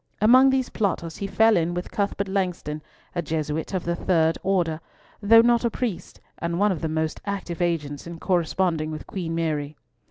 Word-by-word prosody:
Among 255 Hz, +5 st, +6 dB
these 265 Hz, -1 st, +1 dB
plotters 170 Hz, -6 st, -2 dB
he 200 Hz, -, -3 dB
fell 220 Hz, +3 st, +4 dB
in 170 Hz, 0 st, 0 dB
with 175 Hz, -, -4 dB
Cuthbert 200 Hz, -1 st, -1 dB
Langston, 180 Hz, -6 st, -2 dB, 0.3 s
a 175 Hz, -, -1 dB
Jesuit 155 Hz, 0 st, -3 dB
of 180 Hz, -, -2 dB
the 170 Hz, 0 st, 0 dB
third 165 Hz, -2 st, +2 dB
order, 170 Hz, -5 st, 0 dB, 0.4 s
though 225 Hz, +2 st, +7 dB
not 235 Hz, 0 st, +3 dB
a 235 Hz, -, +2 dB
priest, 230 Hz, -5 st, -4 dB, 0.2 s
and 170 Hz, 0 st, -2 dB
one 205 Hz, +2 st, +3 dB
of 170 Hz, -, -3 dB
the 160 Hz, -, -1 dB
most 160 Hz, 0 st, -2 dB
active 195 Hz, -4 st, -4 dB
agents 155 Hz, -4 st, -2 dB
in 170 Hz, 0 st, -7 dB
corresponding 170 Hz, -2 st, 0 dB
with 155 Hz, -1 st, -6 dB
Queen 170 Hz, -4 st, -4 dB
Mary. 155 Hz, -3 st, -2 dB
175 Hz, 185 wpm, -24 LUFS, 160-200 Hz, 0.4 s, though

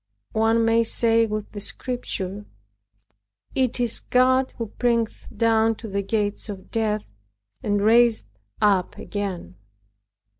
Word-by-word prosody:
One 225 Hz, +1 st, +3 dB
may 230 Hz, 0 st, +4 dB
say 230 Hz, 0 st, +2 dB
with 215 Hz, -1 st, -4 dB
the 205 Hz, -, -7 dB
Scripture, 205 Hz, -3 st, -3 dB, 1.1 s
"It 255 Hz, -2 st, 0 dB
is 240 Hz, -2 st, +2 dB
God 255 Hz, +1 st, +2 dB
who 230 Hz, -, -2 dB
bringeth 235 Hz, -2 st, 0 dB
down 225 Hz, -1 st, +3 dB
to 225 Hz, -, -9 dB
the 200 Hz, -1 st, -2 dB
gates 205 Hz, +1 st, -2 dB
of 195 Hz, -2 st, -8 dB
death, 215 Hz, -2 st, -1 dB, 0.6 s
and 205 Hz, -1 st, 0 dB
raiseth 230 Hz, -, +4 dB, 0.3 s
up 195 Hz, -3 st, +2 dB
again." 185 Hz, -, -5 dB
225 Hz, 120 wpm, -24 LUFS, 205-230 Hz, 1.1 s, may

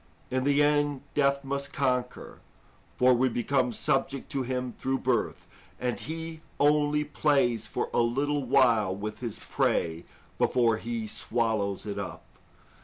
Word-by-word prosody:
In 130 Hz, 0 st, 0 dB
the 145 Hz, +1 st, +4 dB
end, 145 Hz, -1 st, +1 dB
death 140 Hz, -1 st, +2 dB
must 140 Hz, +1 st, -4 dB
conquer, 125 Hz, -3 st, -2 dB, 0.6 s
for 125 Hz, 0 st, +5 dB
we 130 Hz, +2 st, +3 dB
became 125 Hz, +1 st, +1 dB
subject 135 Hz, +1 st, -1 dB
to 135 Hz, -, -1 dB
him 125 Hz, -1 st, -3 dB
through 135 Hz, 0 st, -1 dB
birth, 130 Hz, -3 st, -1 dB, 0.3 s
and 125 Hz, -1 st, -2 dB
he 160 Hz, 0 st, -6 dB, 0.2 s
only 150 Hz, 0 st, +3 dB
plays 135 Hz, -7 st, +1 dB
for -, -, -2 dB
a -, -, +2 dB
little 140 Hz, +5 st, 0 dB
while 115 Hz, -7 st, +3 dB
with 105 Hz, +2 st, -5 dB
his 115 Hz, -4 st, -5 dB
prey 80 Hz, 0 st, -1 dB, 0.3 s
before 115 Hz, -3 st, +3 dB
he 115 Hz, 0 st, -4 dB
swallows 110 Hz, -3 st, -1 dB
it 100 Hz, -1 st, -4 dB
up. 100 Hz, -, -6 dB
130 Hz, 140 wpm, -28 LUFS, 115-140 Hz, 0.6 s, for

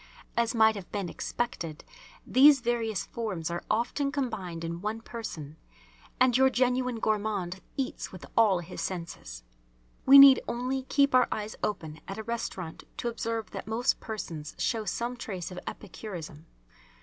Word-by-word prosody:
As 235 Hz, +1 st, +1 dB
might 220 Hz, -1 st, +6 dB
have 200 Hz, -4 st, -9 dB
been 200 Hz, -4 st, -2 dB
expected, 170 Hz, -6 st, -4 dB, 0.4 s
these 275 Hz, +2 st, +7 dB
various 230 Hz, -4 st, -1 dB
forms 190 Hz, -8 st, -4 dB
are 170 Hz, -, -3 dB
often 240 Hz, +6 st, 0 dB
combined 210 Hz, -, -3 dB
in 170 Hz, +1 st, -4 dB
one 215 Hz, +2 st, -2 dB
person, 170 Hz, -11 st, -7 dB, 0.6 s
and 255 Hz, -1 st, +5 dB
your 265 Hz, +1 st, +6 dB
genuine 250 Hz, -1 st, +1 dB
gourmand 205 Hz, -4 st, -1 dB, 0.2 s
eats 265 Hz, -2 st, -3 dB
with 185 Hz, -, -10 dB
all 205 Hz, -6 st, +4 dB
his 175 Hz, +2 st, -7 dB
senses. 165 Hz, -, -5 dB, 0.6 s
We 275 Hz, +1 st, +10 dB
need 275 Hz, -2 st, +10 dB
only 255 Hz, +2 st, -2 dB
keep 280 Hz, -2 st, +3 dB
our 255 Hz, -1 st, +6 dB
eyes 215 Hz, 0 st, -3 dB
open 160 Hz, -7 st, -3 dB
at 195 Hz, -, -5 dB
a 220 Hz, -, -4 dB
restaurant 200 Hz, -7 st, -4 dB
to 240 Hz, -, -1 dB
observe 230 Hz, -1 st, -3 dB
that -, -, -7 dB
most 225 Hz, +3 st, +1 dB
persons 165 Hz, -9 st, -6 dB
show 215 Hz, +5 st, 0 dB
some 235 Hz, +6 st, -2 dB
trace 185 Hz, -7 st, -5 dB
of 180 Hz, -, -6 dB
epicurism. 170 Hz, -6 st, -8 dB
220 Hz, 150 wpm, -29 LUFS, 175-240 Hz, 0.6 s, We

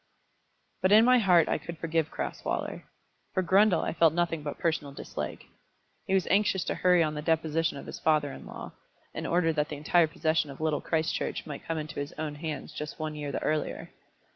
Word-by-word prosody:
But 185 Hz, +1 st, +3 dB
in 220 Hz, +2 st, +8 dB
my 250 Hz, 0 st, +6 dB
heart 180 Hz, -6 st, +5 dB
I -, -, 0 dB
could 170 Hz, +2 st, -8 dB
forgive 160 Hz, -1 st, 0 dB
Crasweller. -, -, -4 dB, 0.5 s
For 185 Hz, -, +2 dB
Grundle 195 Hz, +2 st, +4 dB
I -, -, -2 dB
felt 165 Hz, -2 st, +4 dB
nothing 170 Hz, -2 st, 0 dB
but 145 Hz, -1 st, -5 dB
personal 155 Hz, -4 st, -1 dB
dislike. -, -, -6 dB, 0.6 s
He 190 Hz, -, +2 dB
was 190 Hz, -, +2 dB
anxious 195 Hz, -2 st, +2 dB
to -, -, -2 dB
hurry 180 Hz, -2 st, +4 dB
on 155 Hz, -1 st, -1 dB
the 150 Hz, -, -4 dB
deposition 160 Hz, -1 st, 0 dB
of -, -, -8 dB
his -, -, -7 dB
father 150 Hz, -3 st, +2 dB
in -, -, -10 dB
law, -, -, -8 dB, 0.4 s
in -, -, -4 dB
order 170 Hz, -1 st, +2 dB
that 150 Hz, -1 st, 0 dB
the 150 Hz, -, -5 dB
entire 160 Hz, +3 st, +3 dB
possession 155 Hz, -1 st, 0 dB
of 135 Hz, -, -9 dB
Little 155 Hz, -1 st, 0 dB
Christchurch 160 Hz, -1 st, -1 dB
might 145 Hz, -3 st, -7 dB
come 165 Hz, -, -1 dB
into 155 Hz, -1 st, -5 dB
his 145 Hz, 0 st, -4 dB
own 155 Hz, -1 st, -4 dB
hands 150 Hz, -1 st, -5 dB
just 150 Hz, 0 st, -6 dB
one 155 Hz, -1 st, -3 dB
year 145 Hz, -1 st, -4 dB
the -, -, -3 dB
earlier! 155 Hz, 0 st, -2 dB
160 Hz, 205 wpm, -29 LUFS, 150-175 Hz, 0.6 s, in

